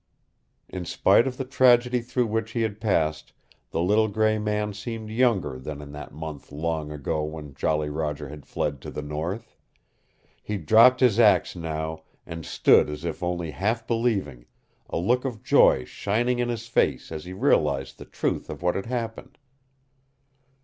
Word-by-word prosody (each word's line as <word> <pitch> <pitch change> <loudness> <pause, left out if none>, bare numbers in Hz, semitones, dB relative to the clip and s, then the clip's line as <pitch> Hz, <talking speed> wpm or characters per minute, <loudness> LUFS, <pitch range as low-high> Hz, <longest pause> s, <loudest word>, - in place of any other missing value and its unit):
In 90 -1 -6
spite 115 +7 +3
of 125 -1 -4
the 135 - -3
tragedy 125 -1 +4
through 125 +1 -1
which 115 +1 -2
he 115 - 0
had 110 -1 -3
passed 80 -8 0 0.4
the 85 - -1
little 105 +4 +3
gray 110 +1 +1
man 105 0 -1
seemed 110 +1 -6
younger 110 - +1
than 75 +2 -6
in 75 -1 -9
that 75 0 -9
month 75 -3 -8
long 80 0 -3
ago 75 +1 -2
when 75 -2 -7
Jolly 75 +3 0
Roger 75 -1 -3
had 75 +1 -10
fled 70 -3 -2
to - - -7
the 75 - -6
north. 80 +10 -5 0.9
He 105 - -3
dropped 115 - +6
his 120 -4 +4
axe 105 -4 +4
now 80 -1 -4 0.2
and 80 -1 -7
stood - - +4
as 75 +2 -6
if 85 -2 -4
only 85 -2 -2
half 115 +7 -1
believing, 100 - -1 0.4
a - - -2
look 120 +9 +1
of 125 -6 -5
joy 65 - +5
shining 120 - -1
in 120 0 0
his 115 -1 -3
face 75 - 0
as 80 0 -6
he 90 - -7
realized 70 -7 +1
the - - -9
truth - - -3
of - - -7
what 90 0 +2
had 95 - -4
happened. 120 +1 -5
95 Hz, 170 wpm, -25 LUFS, 75-115 Hz, 0.9 s, dropped